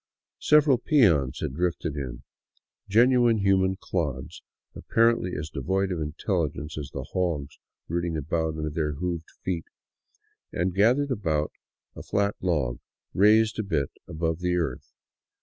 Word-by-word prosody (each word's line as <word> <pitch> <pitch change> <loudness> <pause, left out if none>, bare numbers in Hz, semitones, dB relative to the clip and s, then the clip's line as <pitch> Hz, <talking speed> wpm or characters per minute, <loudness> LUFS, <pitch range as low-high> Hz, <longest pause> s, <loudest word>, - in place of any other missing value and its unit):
Several 150 -4 +4
peons 85 - +3
had - - -2
drifted 85 -1 -1
in, 65 -4 -6 0.7
genuine 120 +2 +5
human 95 -2 +2
clods, 70 -8 -3 0.3
apparently 115 -5 +2
as 75 +1 -5
devoid 95 +7 -1
of 85 -3 -2
intelligence 75 -1 -2
as 75 -2 -5
the - - -5
hogs 80 -6 -2 0.3
rooting 85 -1 -1
about 80 +2 -1
under 75 -1 -3
their 75 -1 -1
hoofed 85 +1 -4
feet, 90 -3 -2 0.9
and 90 +2 -1
gathered 125 +9 +3
about 80 -10 0 0.4
a - - -8
flat 100 0 0
log 75 -10 0 0.3
raised 110 +3 +4
a - - 0
bit 75 -9 -1 0.2
above 80 -1 -2
the 90 0 0
earth. 80 -8 -3
85 Hz, 130 wpm, -26 LUFS, 75-100 Hz, 0.9 s, genuine